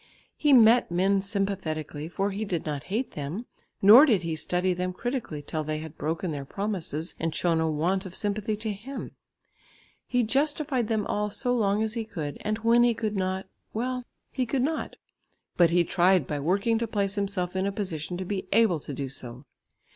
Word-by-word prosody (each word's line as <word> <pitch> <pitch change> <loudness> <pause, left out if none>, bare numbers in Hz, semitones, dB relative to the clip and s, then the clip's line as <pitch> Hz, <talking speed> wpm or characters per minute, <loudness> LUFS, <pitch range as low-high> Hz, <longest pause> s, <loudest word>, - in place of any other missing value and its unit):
He 295 - +2
met 240 -2 +6
men 190 +3 +2
sympathetically, 185 -7 -3
for 195 +3 -1
he 200 +3 -3
did 180 -6 -2
not 150 -2 -4
hate 225 +7 -2
them, 155 +11 -5 0.4
nor 235 +10 +10
did 210 -9 +3
he 165 -1 -2
study 180 +3 0
them 180 +1 -2
critically 230 - -4
till 155 +2 -3
they 155 0 -2
had 155 0 -8
broken 165 +3 -2
their 145 -2 -4
promises 175 -2 -2
and 165 -1 -2
shown 170 -2 +2
a 160 - +1
want 180 +6 0
of 185 - -9
sympathy 210 +1 -1
to 215 0 -3
him. 250 +8 -7 1.0
He 245 -1 +2
justified 275 0 +1
them 215 -2 0
all 210 0 -1
so 245 +4 -1
long 210 -2 +2
as 220 -1 -1
he 230 -1 -2
could, 160 -10 -6
and 215 +1 -1
when 230 +2 +4
he 240 -1 +4
could 215 -2 -2
not, 190 0 -1 0.3
well, 250 +2 -2 0.3
he 255 -2 -1
could 255 +1 0
not, 315 +3 -2 0.6
but 175 -2 +5
he 175 +1 +4
tried 180 -1 +3
by 145 +1 -3
working 200 +9 +1
to 230 - -1
place 200 -2 -1
himself 195 -3 -2
in 190 +1 0
a - - 0
position 180 -4 -3
to 185 - -4
be 190 0 -3
able 215 -7 +4
to 145 -1 -7
do 140 0 -3
so. 125 0 -8
195 Hz, 195 wpm, -27 LUFS, 165-220 Hz, 1.0 s, nor